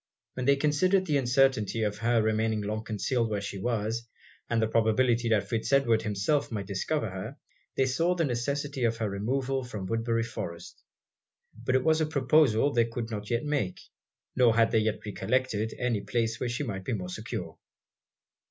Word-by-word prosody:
When 125 Hz, 0 st, -3 dB
they 140 Hz, -, +6 dB
considered 185 Hz, +7 st, +2 dB
the 150 Hz, -5 st, +2 dB
uncertainty 130 Hz, -4 st, +2 dB
of 105 Hz, -1 st, -2 dB
her 115 Hz, 0 st, +2 dB
remaining 110 Hz, 0 st, +1 dB
long 110 Hz, +2 st, -3 dB
concealed 115 Hz, +2 st, -1 dB
where 105 Hz, -1 st, -1 dB
she 100 Hz, 0 st, -5 dB
was, 115 Hz, +1 st, -2 dB, 0.4 s
and 120 Hz, -, +1 dB
the 110 Hz, -, +2 dB
probability 115 Hz, +2 st, +2 dB
that 105 Hz, -3 st, +2 dB
Fitz 115 Hz, +3 st, -2 dB
Edward 120 Hz, -5 st, +4 dB
himself 110 Hz, +8 st, 0 dB
might 105 Hz, -3 st, -3 dB
discover 105 Hz, +8 st, -1 dB
her, 95 Hz, -1 st, -6 dB, 0.4 s
they 135 Hz, -, +4 dB
saw 165 Hz, +8 st, +1 dB
the 165 Hz, -2 st, +1 dB
necessity 140 Hz, +2 st, -2 dB
of 115 Hz, -1 st, +1 dB
her 110 Hz, -1 st, -1 dB
removal 130 Hz, +7 st, -1 dB
from 110 Hz, -6 st, -6 dB
Woodbury 115 Hz, +2 st, 0 dB
Forest. 85 Hz, -7 st, -7 dB, 0.7 s
But 120 Hz, +3 st, -1 dB
it 130 Hz, -, +3 dB
was 160 Hz, 0 st, +3 dB
a 155 Hz, -, +1 dB
proposal 140 Hz, -3 st, +3 dB
they 115 Hz, -1 st, +3 dB
could 115 Hz, 0 st, -5 dB
not 105 Hz, -1 st, -5 dB
yet 120 Hz, +4 st, 0 dB
make 140 Hz, -11 st, -1 dB, 0.6 s
nor 120 Hz, -3 st, +4 dB
had 115 Hz, -1 st, +4 dB
they 110 Hz, -, +4 dB
yet 110 Hz, 0 st, -1 dB
recollected 110 Hz, +1 st, -1 dB
any 120 Hz, -4 st, 0 dB
place 115 Hz, +2 st, -1 dB
where 125 Hz, -, -1 dB
she 125 Hz, +5 st, -2 dB
might 100 Hz, -7 st, -4 dB
be 120 Hz, -, -2 dB
more 90 Hz, -4 st, -4 dB
secure. -, -, -6 dB
115 Hz, 180 wpm, -28 LUFS, 110-130 Hz, 0.7 s, they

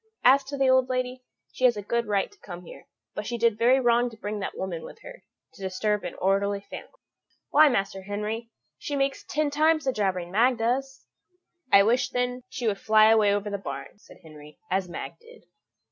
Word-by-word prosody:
As 270 Hz, +2 st, +6 dB
to 280 Hz, +1 st, -6 dB
the 270 Hz, -1 st, +2 dB
old 260 Hz, 0 st, +4 dB
lady, 255 Hz, 0 st, -2 dB, 0.3 s
she 255 Hz, -, 0 dB
has 240 Hz, -3 st, +4 dB
a 205 Hz, -, -5 dB
good 235 Hz, +2 st, -1 dB
right 205 Hz, -, 0 dB
to 410 Hz, -, -22 dB
come 180 Hz, -2 st, -10 dB
here, -, -, -13 dB, 0.3 s
but 210 Hz, -, -5 dB
she 240 Hz, -, -3 dB
did 230 Hz, -2 st, +1 dB
very 250 Hz, +3 st, +4 dB
wrong 240 Hz, -1 st, +2 dB
to 225 Hz, -, -14 dB
bring 210 Hz, 0 st, -4 dB
that 195 Hz, -, -5 dB
woman 180 Hz, -3 st, -4 dB
with -, -, -10 dB
her, -, -, -12 dB, 0.3 s
to -, -, -16 dB
disturb 200 Hz, +2 st, -1 dB
an 175 Hz, -, -6 dB
orderly 200 Hz, +1 st, 0 dB
family. -, -, -7 dB, 0.6 s
Why, 300 Hz, +1 st, +7 dB
Master 195 Hz, -5 st, -1 dB
Henry, 210 Hz, +4 st, -4 dB, 0.3 s
she 290 Hz, -, -4 dB
makes 275 Hz, 0 st, -1 dB
ten 300 Hz, 0 st, -1 dB
times 310 Hz, +1 st, +2 dB
the 265 Hz, -, +1 dB
jabbering 185 Hz, -5 st, -1 dB
Mag 240 Hz, +5 st, +3 dB
does." 265 Hz, +4 st, -2 dB, 0.7 s
"I 200 Hz, -, +8 dB
wish, 240 Hz, +4 st, +2 dB
then, 250 Hz, 0 st, -2 dB
she 250 Hz, -1 st, -5 dB
would 205 Hz, -3 st, 0 dB
fly 215 Hz, 0 st, +5 dB
away 215 Hz, -2 st, +4 dB
over 205 Hz, 0 st, -1 dB
the 200 Hz, -, -3 dB
barn," 140 Hz, +3 st, -8 dB
said -, -, -17 dB
Henry, 150 Hz, -1 st, -14 dB
"as 190 Hz, -1 st, 0 dB
Mag -, -, -7 dB
did." 470 Hz, +1 st, -17 dB
225 Hz, 205 wpm, -26 LUFS, 200-255 Hz, 0.7 s, I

